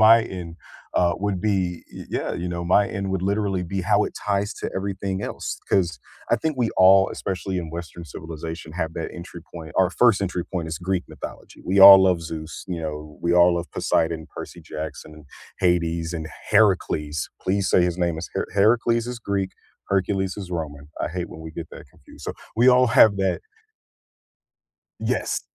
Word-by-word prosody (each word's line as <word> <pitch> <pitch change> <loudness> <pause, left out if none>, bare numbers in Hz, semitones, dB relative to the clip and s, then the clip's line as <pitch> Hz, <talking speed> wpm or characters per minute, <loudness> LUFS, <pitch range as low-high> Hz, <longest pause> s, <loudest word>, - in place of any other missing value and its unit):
my 115 +1 +8
end, 90 -6 -7 0.4
uh, 85 -1 +3
would 100 -2 -1
be 95 -4 -1
eh, - - -7
yeah, - - -2
you 90 +1 -3
know, 85 0 -4
my 100 +3 +4
end 100 -2 -3
would 95 -2 -1
literally 100 -1 0
be 95 +2 -3
how 90 - +3
it - - -5
ties 100 0 -1
to - - -5
everything 95 0 -3
else, - - -4
'cause 85 -6 +1 0.3
I - - +5
think 160 -3 -2
we 120 -3 +1
all, 95 0 +7
especially 95 0 -3
in 85 -2 -5
Western 85 +1 -7
civilization, 80 +2 -7
have 80 -2 -3
that 80 - -4
entry 85 0 -9
point. 80 -3 -8
Our 95 -1 +4
first 115 0 +4
entry 90 -3 -2
point 85 -4 -4
is 80 0 -4
Greek 90 0 -1
mythology, - - -9
we 95 +1 +2
all 95 0 +12
love 90 -3 +2
Zeus, 80 -1 -7
you 85 -2 -3
know, 75 -1 -6
we 85 - +1
all 90 0 +6
love 85 0 -4
Poseidon, 80 -1 0
Percy - - -8
Jackson, 75 0 -7
and 75 -1 -15 0.3
Hades, 85 -2 +1
and 80 -2 -4 0.2
Heracles. 80 -8 +2
Please 95 +1 0
say 90 - +5
his 90 0 0
name 85 -2 0
is 85 - -5
H - - 0
Heracles 115 +3 +3
is 125 -1 -5
Greek, 100 -3 -2 0.4
Hercules 95 0 0
is 95 -3 -7
Roman. 75 -4 -5
I - - -1
hate 90 +1 -4
when - - -10
we 80 0 -8
get 80 -1 -7
that - - -11
confused, - - -16
so, - - -3 0.2
we 120 +3 +4
all 125 0 +6
have 110 -4 +6
that 95 -2 0 1.6
Yes. - - -1
90 Hz, 190 wpm, -23 LUFS, 85-100 Hz, 1.6 s, all